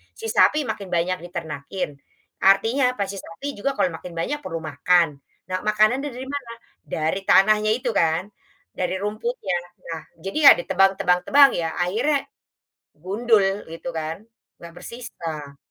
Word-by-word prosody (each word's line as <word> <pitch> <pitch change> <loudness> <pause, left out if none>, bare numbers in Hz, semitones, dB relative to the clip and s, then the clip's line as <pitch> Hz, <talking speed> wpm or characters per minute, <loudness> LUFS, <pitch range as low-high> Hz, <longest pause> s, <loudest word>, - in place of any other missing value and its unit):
si 450 - -9
sapi 305 0 +4
makin 200 -3 -7
banyak 180 +2 0
diternakin, 165 0 -5 0.6
artinya 225 +8 +4
pas 200 - -1
si 200 - -7
sapi 165 +13 -8
juga 275 +5 -1
kalau 275 - +1
makin 180 - -9
banyak 275 - -2
perlu 165 - -5
makan, 165 +3 +3 0.4
nah 185 - 0
makanannya 215 +7 +3
dari 255 - -6
mana? 255 -5 -6 0.4
Dari 160 +4 0
tanahnya 215 +2 +5
itu 245 0 -3
kan, 170 +5 0 0.5
dari 180 0 0
rumputnya. 215 -2 -2 0.4
Nah 165 - -4 0.2
jadi 195 +10 -4
ya - - +13
ditebang 195 +2 +3
tebang 180 0 +3
tebang 280 -1 +7
ya 165 -6 -1 0.2
akhirnya, 255 +11 0 0.8
gundul 210 +2 +2 0.2
gitu 165 +1 -7
kan 160 +3 -5 0.4
nggak 170 0 -11
bersisa. 165 - -7
195 Hz, 145 wpm, -23 LUFS, 170-235 Hz, 0.8 s, ya